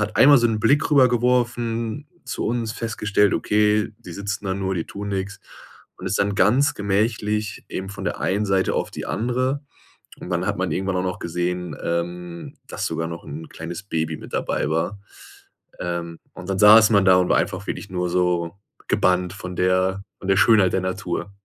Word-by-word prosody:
hat 105 - -2
einmal 140 +1 +8
so 120 - +3
'nen 110 -1 0
Blick 145 +8 +3
rüber 135 -3 +6
geworfen 120 +1 0 0.2
zu - - -4
uns, 115 -1 -1
festgestellt, 105 -3 +1
okay, 105 0 +2
die 120 - -10
sitzen 100 0 -4
da 95 - 0
nur, 95 -1 -2
die 85 - -2
tun 100 0 -7
nix. 95 -1 -3 0.6
Und - - -7
ist 95 - 0
dann 100 0 +1
ganz 135 +11 +3
gemächlich 105 +1 -1
eben 95 +1 -5
von 100 - -8
der - - -2
einen 100 +3 0
Seite 95 -1 +1
auf - - -1
die - - -6
andere. 130 +5 -1 0.6
Und - - -8
dann 90 0 -1
hat 100 - -1
man 90 -3 -1
irgendwann 95 +2 -1
auch 90 - 0
noch 90 -1 -3
gesehen, 90 -1 -3
ähm, 85 0 -4
dass - - -4
sogar 80 - -3
noch 85 0 -7
'n 80 +3 -8
kleines 85 +2 -7
Baby 80 -4 -2
mit - - -12
dabei - - -1
war. 85 +6 -1 0.8
Ähm. 85 -1 -4
Und 90 -1 -10
dann 95 0 -1
saß 105 +1 +8
man 100 -2 +4
da 95 -1 +7
und 90 -1 +2
war - - +4
einfach - - -2
wirklich 100 - -5
nur 90 -1 -1
so 90 -1 0 0.3
gebannt 90 0 +2
von 90 -3 -7
der 95 +1 +1 0.2
von 95 - -8
der 95 - +4
Schönheit 105 -5 +5
der - - +2
Natur. 95 0 -3
95 Hz, 195 wpm, -22 LUFS, 90-110 Hz, 0.8 s, einmal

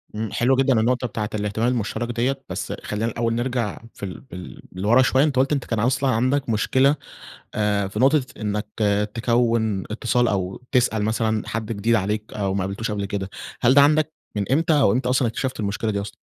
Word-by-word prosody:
امم 110 0 -2
حلوة 125 +2 +2
جدًا 135 -3 +3
النقطة 125 +2 +1
بتاعة 105 -1 -3
الاهتمام 105 +3 -1
المشترك 120 0 -1
ديّة، 130 +3 -1
بس - - -4
خلينا 105 +1 -2
الأول 115 0 -1
نرجع 120 -3 -2
في - - -14
ال 95 - -7
بال 90 -9 -10
لورا 105 +7 +3
شوية 130 +1 +3
أنتَ 145 -3 +1
قلت 135 +3 +2
إن 140 - +2
كان 115 -3 -3
أصلًا 130 +4 +1
عندك 130 +3 +1
مشكلة 130 +6 +3 0.6
آآ 105 -2 +1
في 105 - -6
نقطة 140 +3 +4 0.2
إنك 105 0 -2 0.5
تكوًِن 115 -4 +1
اتصال 120 +2 +1
أو 95 +2 -2
تسأل 120 -5 +2
مثلًا 110 0 0
حد 115 0 -3
جديد 110 +2 +1
عليك، 105 +1 -1
أو 100 -2 -1
ما 100 - 0
قابلتوش 100 +4 -3
قبل 100 -1 -2
كده. 95 -1 -4 0.3
هل 130 +2 +4
ده 145 - +8
عندك 155 +1 +3 0.2
من 105 +5 -1
إمتى 160 +3 +3
أو 100 - +4
إمتى 125 +2 0
أصلًا 130 -1 +2
اكتشفت 130 +2 -3
المشكلة 105 +2 -1
دي 100 -1 -1
أصلًا؟ 100 - -7
115 Hz, 195 wpm, -23 LUFS, 105-130 Hz, 0.6 s, ده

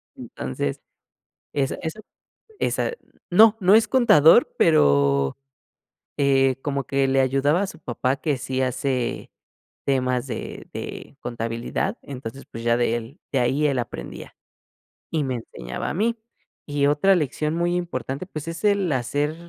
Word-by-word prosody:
Entonces, 65 +2 -4 0.7
es 140 -2 0
eso 160 +6 -4 0.6
esa - - 0 0.4
no, 220 +4 +7
no 190 -1 +5
es 220 +1 +5
contador, 235 - +6
pero, 70 - +3 0.8
eh, 135 -2 +3
como 140 -2 -2
que 135 +1 +1
le 135 0 +3
ayudaba 135 +6 +2
a - - 0
su 165 -4 -11
papá 130 0 -1
que 145 0 -1
sí 130 +1 -2
hace 130 -1 -2 0.5
temas 130 -2 +1
de 135 - -6
de - - -7
contabilidad 115 -1 -3
entonces, 135 -1 -8
pues, 115 - -8
ya 120 0 +3
de 120 -1 +1
él 120 - -7
de 135 - 0
ahí 135 +5 +2
él 140 -2 0
aprendía 115 - -6 0.8
y 155 -3 0
me 130 -1 -2
enseñaba 60 - -6
a - - -3
mí. 225 +6 +1 0.5
Y 145 -1 0
otra 150 +7 +4
lección 155 0 -1
muy 175 +1 +1
importante, 170 -4 -3
pues, 155 -4 -7
es 165 0 -6
el 200 -5 +2
hacer, 145 +4 -1
140 Hz, 145 wpm, -23 LUFS, 125-160 Hz, 0.8 s, no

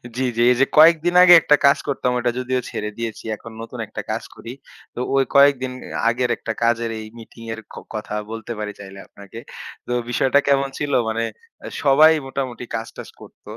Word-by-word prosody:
জী, 130 - -1
জী। - - +2
এই 125 - +3
যে - - +6
কয়েকদিন 165 +2 +5
আগে 180 - +8
একটা 150 - +4
কাজ 140 - +5
করতাম, 130 -3 -1
ওটা 120 0 0
যদিও 130 0 -1
ছেড়ে 105 - -4
দিয়েছি। 115 -2 -5
এখন 115 - -12
নতুন 115 +1 -9
একটা - - -6
কাজ - - -3
করি। 115 - -9 0.4
তো - - -6 0.2
ওই 135 - +4
কয়েকদিন 140 -2 +4 0.4
আগের 120 +1 -1
একটা 110 - -5
কাজের 115 0 +1
এই 110 - -8
মিটিংয়ের 115 0 -9
ক - - -11 0.2
কথা 105 0 -5 0.2
বলতে 115 0 -7
পারি 105 -1 -4
চাইলে 95 -1 -11
আপনাকে। 100 +3 -12 0.5
তো - - -5 0.2
বিষয়টা 135 +3 +2
কেমন 140 -1 +2
ছিল? 145 -1 -3 0.2
মানে 115 +1 -2 0.6
সবাই 150 +3 +6 0.2
মোটামুটি 130 -2 -5
কাজ 115 0 -4
টাজ - - -9
করত। - - -16
125 Hz, 185 wpm, -21 LUFS, 115-140 Hz, 0.6 s, আগে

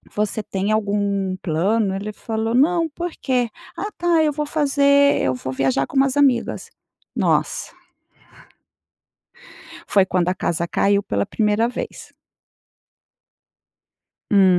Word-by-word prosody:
você 210 +1 -1
tem 195 0 -2
algum 200 -3 0
plano?". 190 +5 0
Ele 205 +2 -4
falou: 225 +1 -3
"Não, 330 +5 +3
porquê?". 265 -7 -2 0.3
"Ah, 420 - -4
tá, 340 -2 +2
eu 300 - +2
vou 300 +1 -3
fazer 280 -1 +3
Eu 130 - +1
vou 130 +1 -5
viajar 135 0 +1
com - - -5
umas 270 0 +2
amigas". 265 -5 +1 0.5
Nossa! - - 0 2.2
Foi 195 -2 +5
quando 180 -1 0
a 185 - +1
casa 170 -2 -2
caiu 200 0 +2
pela 100 - -1
primeira 215 +1 +1
vez. 245 - -7 2.2
Hum. 190 -3 +5
215 Hz, 120 wpm, -21 LUFS, 190-280 Hz, 2.2 s, Foi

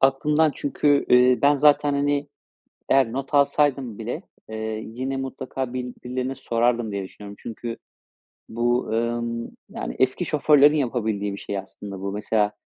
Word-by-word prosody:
aklımdan 150 +4 +3
çünkü, 145 0 +1
eee, 125 0 +6
ben 145 +1 +6
zaten, 145 0 +4
hani, 145 0 0 0.6
eğer 130 -4 +3
not 135 +2 -4
alsaydım 140 -5 +2
bile, 120 - -4 0.3
eee, 110 - -6 0.3
yine 130 +4 -4
mutlaka 130 -1 -4
bil 125 -1 -4
birilerine 130 +1 -3
sorardım 120 -2 0
diye 100 -1 -3
düşünüyorum. 100 +1 -11
Çünkü 115 0 -6 0.7
bu, 120 +2 0
ımm, 115 +1 -2 0.2
yani, - - -5
eski 130 +7 +1
şoförlerin 150 -1 +5
yapabildiği 110 -7 -1
bir 100 - -6
şey 100 - -4
aslında 95 0 -8
bu. 100 0 -3
Mesela, 105 0 0
125 Hz, 140 wpm, -24 LUFS, 115-140 Hz, 0.7 s, eee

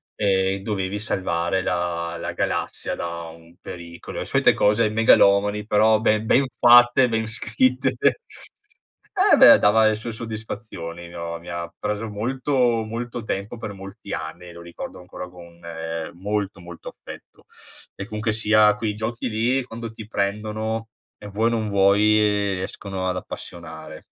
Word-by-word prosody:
ehm, 95 -1 +1
dovevi 100 -2 -2
salvare 95 -3 -1
la 85 -1 -2
la - - -4
galassia - - -2
da 85 0 -5
un 85 +1 -14
pericolo. 85 -1 -8
E - - -4
solite - - +3
cose 105 +2 +3
megalomani 105 -1 +4
però 110 +1 +4
ben 110 0 +1
ben 135 +4 +3
fatte, 120 +1 +6
ben 110 -1 -1
scritte. 130 +4 0 1.2
Eh - - +6
beh, - - +9
dava 110 +1 +5
le 110 - +2
sue 115 +2 -5
soddisfazioni. 105 -6 -7
Mi 85 - -13
ho 85 0 -5
mi 85 - -12
ha 85 -1 -4
preso 105 +2 -3
molto 120 +1 0
molto 115 +1 -5
tempo, 105 +2 -4
per 110 - -6
molti 95 0 -9
anni, 85 +2 -6
lo 85 - -11
ricordo 85 +1 -8
ancora 90 0 -9
con, 85 -1 -15
ehm, 80 -1 -5
molto, 100 -1 -2
molto 85 0 -9
affetto. - - -13 0.5
E 95 - -6
comunque 110 +1 -2
sia 110 -1 +4
quei 105 -1 -2
giochi 115 +3 -3
lì, 120 +5 +1
quando 115 -1 -7
ti 110 -1 -10
prendono 110 +2 -2 0.3
e 105 - -13
vuoi 110 +3 +1
o - - +3
non 110 -2 -1
vuoi, 100 0 +4 0.6
riescono 95 0 -5
ad 90 - -2
appassionare. - - -8
105 Hz, 150 wpm, -23 LUFS, 90-110 Hz, 1.2 s, beh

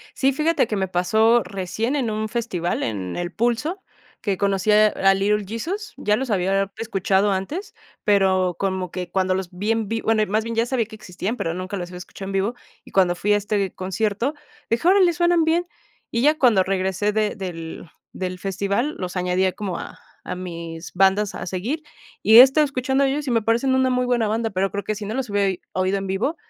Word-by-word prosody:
Sí, 270 0 +2
fíjate 305 -1 +1
que 210 - -2
me 190 -1 0
pasó 220 +6 +3
recién 200 +7 -3
en 260 -6 0
un 215 0 -2
festival 210 -7 -2
en 95 -5 -3
El 175 0 -3
Pulso, 240 - -1 0.4
que 195 -3 -1
conocí 200 0 +1
a 215 0 +6
a 195 -2 +3
Little 205 +2 +1
Jesus, 380 - -4
ya 210 - +1
los 265 +1 -3
había 195 0 +1
escuchado 195 -2 +1
antes, 195 - -3 0.3
pero 190 -3 +3
como 190 -2 -2
que 180 -1 -5
cuando 185 -1 +1
los 185 -1 -3
vi 200 +5 -2
en 225 -2 0
vi 225 +1 -2
bueno, 220 -1 +2
más 215 +2 0
bien 230 0 -4
ya 230 +1 +2
sabía 240 -2 0
que 220 - -12
existían, 210 +3 -5
pero 165 - -2
nunca 185 +3 -4
los 175 -1 -5
había 180 0 -8
escuchado 195 +2 -9
en - - -5
vivo. 195 +4 0 0.3
Y - - -16
cuando 180 -2 +3
fui 205 +4 +1
a 205 - +4
este 205 -1 -1
concierto, 210 +7 -1 0.4
dije: 235 +9 +1
"Órale, 370 -2 +5
suenan 345 0 +3
bien". 340 +2 +1 0.4
Y 230 - 0
ya, 300 +3 +4
cuando 235 -10 +4
regresé 190 +2 0
de 215 0 0
del 170 -4 -7 0.2
del 185 -1 -5
festival, 200 - -1
los 180 0 -5
añadí 180 +1 +1
como 195 -4 -4
a - - -8 0.3
a 180 - -4
mis 170 -2 -7
bandas 195 +2 +3
a - - -6
seguir. 215 - -3 0.4
Y 220 +3 +7
he - - +14
estado 270 +4 +6
escuchando 265 0 0
de 270 - +1
ellos 290 +1 -3
y - - 0
me 230 -1 +2
parecen 235 +5 +1
una 260 0 +3
muy 250 0 +1
buena 240 -3 +1
banda, 225 +2 0
pero 195 -1 0
creo 200 +1 -4
que 215 - -2
si 210 0 -6
no 210 - -4
los 255 -1 -3
hubiera 200 -1 +2
i 185 - -8
oído 185 +1 0
en 195 0 -4
vivo, 195 - -1
205 Hz, 215 wpm, -22 LUFS, 190-235 Hz, 0.4 s, he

